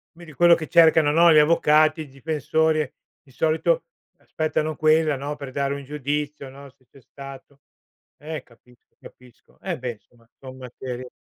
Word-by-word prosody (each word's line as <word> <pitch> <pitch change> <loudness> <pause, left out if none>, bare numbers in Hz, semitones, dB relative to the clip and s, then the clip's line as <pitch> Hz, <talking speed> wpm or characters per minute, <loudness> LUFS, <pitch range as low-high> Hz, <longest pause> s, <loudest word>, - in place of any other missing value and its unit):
Vedi 165 -2 -13
quello 170 +3 +5
che 155 -2 -6
cercano, 160 -3 +5
no, 170 +2 +5
gli 155 - +5
avvocati, 155 0 +3
i 155 - -8
difensori, 155 +1 -1 0.3
di 135 - -23
solito, 160 - 0 0.3
aspettano 155 0 -3
quella, 155 0 +2
no, 140 +2 -5
per 140 -3 -9
dare 140 +1 -2
un 140 - -8
giudizio, 145 0 -4
no, 140 +1 -13
se 130 0 -34
c'è 140 - -19
stato. 135 +1 -13 0.6
Eh, 155 +2 -7
capisco 125 +1 -26
capisco. 125 -1 -19
E, 185 -4 -4
beh, 125 -1 -4
insomma 115 +1 -27
son 130 -1 -11
materie 125 0 -8
145 Hz, 160 wpm, -23 LUFS, 135-155 Hz, 0.6 s, quello